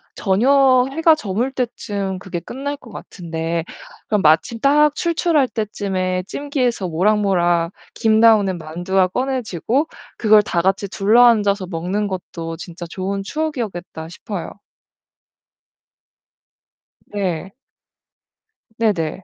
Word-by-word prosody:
저녁 255 Hz, +5 st, +4 dB
해가 320 Hz, +2 st, +4 dB
저물 235 Hz, -1 st, -2 dB
때쯤 205 Hz, -7 st, -3 dB
그게 185 Hz, -2 st, -5 dB
끝날 280 Hz, +9 st, -5 dB
것 240 Hz, -5 st, -15 dB
같은데 165 Hz, -3 st, -4 dB, 0.4 s
그럼 210 Hz, -2 st, +1 dB
마침 160 Hz, +9 st, +3 dB
딱 295 Hz, +1 st, +4 dB
출출할 330 Hz, -4 st, +1 dB
때쯤에 190 Hz, -4 st, -2 dB
찜기에서 255 Hz, -8 st, -2 dB
모락모락 175 Hz, -2 st, +2 dB, 0.2 s
김 220 Hz, -1 st, +2 dB
나오는 210 Hz, -5 st, +5 dB
만두가 175 Hz, +4 st, 0 dB
꺼내지고 255 Hz, -, -1 dB, 0.3 s
그걸 215 Hz, -1 st, +5 dB
다 175 Hz, -4 st, -1 dB
같이 195 Hz, +2 st, 0 dB
둘러앉아서 205 Hz, -1 st, +3 dB
먹는 185 Hz, +5 st, -2 dB
것도 170 Hz, -3 st, -6 dB
진짜 175 Hz, 0 st, -8 dB
좋은 195 Hz, +3 st, -3 dB
추억이었겠다 215 Hz, -, -4 dB
싶어요. 190 Hz, 0 st, -6 dB, 2.6 s
네. 190 Hz, -3 st, -3 dB, 1.3 s
네 225 Hz, -2 st, +3 dB
네. 165 Hz, +1 st, -4 dB
200 Hz, 235 characters per minute, -20 LUFS, 180-245 Hz, 2.6 s, 나오는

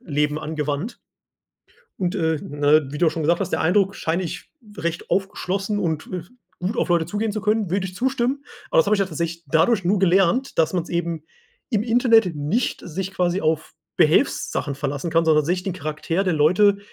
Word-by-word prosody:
Leben 150 Hz, -1 st, 0 dB
angewandt. 150 Hz, -, -3 dB, 1.0 s
Und, 180 Hz, -2 st, -1 dB
äh, 160 Hz, -1 st, +1 dB
ne, 145 Hz, +1 st, +2 dB
wie 150 Hz, -, -5 dB
du 170 Hz, -, +4 dB
schon 160 Hz, -, -4 dB
gesagt 170 Hz, +4 st, +2 dB
hast, 195 Hz, -, -2 dB
der -, -, 0 dB
Eindruck 195 Hz, +4 st, +2 dB
scheine 165 Hz, +3 st, -1 dB
ich 170 Hz, -, -6 dB, 0.3 s
recht 170 Hz, +1 st, -4 dB
aufgeschlossen 195 Hz, +1 st, -1 dB
und, 160 Hz, -6 st, -2 dB
äh, 180 Hz, -, -3 dB, 0.4 s
gut 195 Hz, +7 st, -3 dB
auf -, -, 0 dB
Leute 170 Hz, -2 st, +2 dB
zugehen 210 Hz, 0 st, -2 dB
zu 215 Hz, -, -3 dB
können. 210 Hz, -3 st, 0 dB
Würde 190 Hz, 0 st, 0 dB
ich 185 Hz, -, -9 dB
zustimmen. 260 Hz, +4 st, -1 dB, 0.3 s
Aber -, -, +3 dB
das -, -, +5 dB
habe 210 Hz, -, +3 dB
ich -, -, -1 dB
ja 195 Hz, -, +2 dB
tatsächlich 170 Hz, -2 st, -4 dB
dadurch 180 Hz, -, +2 dB
nur 195 Hz, +3 st, +2 dB
gelernt, 195 Hz, +8 st, +2 dB
dass 160 Hz, -1 st, +3 dB
man's 175 Hz, -3 st, -2 dB
eben 170 Hz, -2 st, -2 dB, 0.5 s
im 215 Hz, -3 st, +1 dB
Internet 230 Hz, -6 st, +3 dB
nicht 150 Hz, -, -1 dB
sich 190 Hz, +3 st, -4 dB
quasi 180 Hz, 0 st, 0 dB
auf 160 Hz, 0 st, -1 dB, 0.2 s
Behelfssachen 140 Hz, -, +2 dB
verlassen 145 Hz, +3 st, -3 dB
kann, 165 Hz, 0 st, +3 dB
sondern 155 Hz, -2 st, +4 dB
sich 180 Hz, +4 st, 0 dB
den 190 Hz, -, -3 dB
Charakter 165 Hz, +2 st, -2 dB
der 185 Hz, -, +1 dB
Leute 185 Hz, +7 st, +4 dB
175 Hz, 190 wpm, -22 LUFS, 160-200 Hz, 1.0 s, das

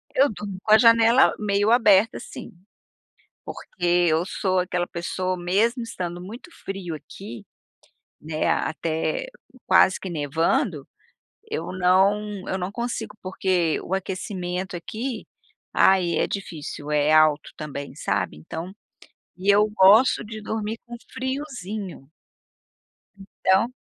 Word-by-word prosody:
Eu 275 Hz, +2 st, +5 dB
durmo 200 Hz, -2 st, -6 dB
com 215 Hz, -, -1 dB
a -, -, +10 dB
janela 230 Hz, +2 st, +5 dB
meio 205 Hz, 0 st, +1 dB
aberta, 215 Hz, -3 st, +4 dB
sim, -, -, -9 dB, 0.9 s
porque 180 Hz, -, -8 dB, 0.2 s
eu 160 Hz, +2 st, +2 dB
sou 185 Hz, -1 st, 0 dB
aquela 180 Hz, -1 st, -1 dB
pessoa, 185 Hz, +2 st, -3 dB
mesmo 210 Hz, +8 st, +1 dB
estando 175 Hz, -6 st, -5 dB
muito 225 Hz, -, -10 dB, 0.2 s
frio 190 Hz, -4 st, -5 dB
aqui, 155 Hz, -, -10 dB, 0.8 s
né, 155 Hz, 0 st, -2 dB
até 165 Hz, -, -1 dB, 0.4 s
quase 185 Hz, 0 st, +5 dB
que 190 Hz, -, -6 dB
nevando, 160 Hz, -, 0 dB, 0.6 s
eu 445 Hz, -, -3 dB
não 190 Hz, +2 st, +1 dB
eu 190 Hz, -, -1 dB
não 185 Hz, +1 st, -4 dB
consigo, 240 Hz, -1 st, -4 dB
porque 185 Hz, -3 st, 0 dB
o 185 Hz, -, -5 dB
aquecimento 185 Hz, -1 st, -4 dB
aqui, 225 Hz, +8 st, -5 dB, 0.5 s
ai, 180 Hz, -4 st, +4 dB
é -, -, +2 dB
difícil. 155 Hz, -6 st, -6 dB
É 150 Hz, 0 st, +2 dB
alto 155 Hz, -1 st, +4 dB
também, 140 Hz, -2 st, -7 dB
sabe, 75 Hz, -, -2 dB
então. 165 Hz, -, -7 dB, 0.6 s
E 195 Hz, +2 st, +3 dB
eu 210 Hz, +1 st, +4 dB
gosto 210 Hz, +5 st, +5 dB
de 215 Hz, 0 st, -8 dB
dormir 220 Hz, +1 st, -4 dB
com 240 Hz, -, -7 dB, 0.2 s
friozinho. 220 Hz, -, -5 dB, 1.1 s
Então, 195 Hz, +1 st, +1 dB
190 Hz, 120 wpm, -24 LUFS, 175-215 Hz, 1.1 s, a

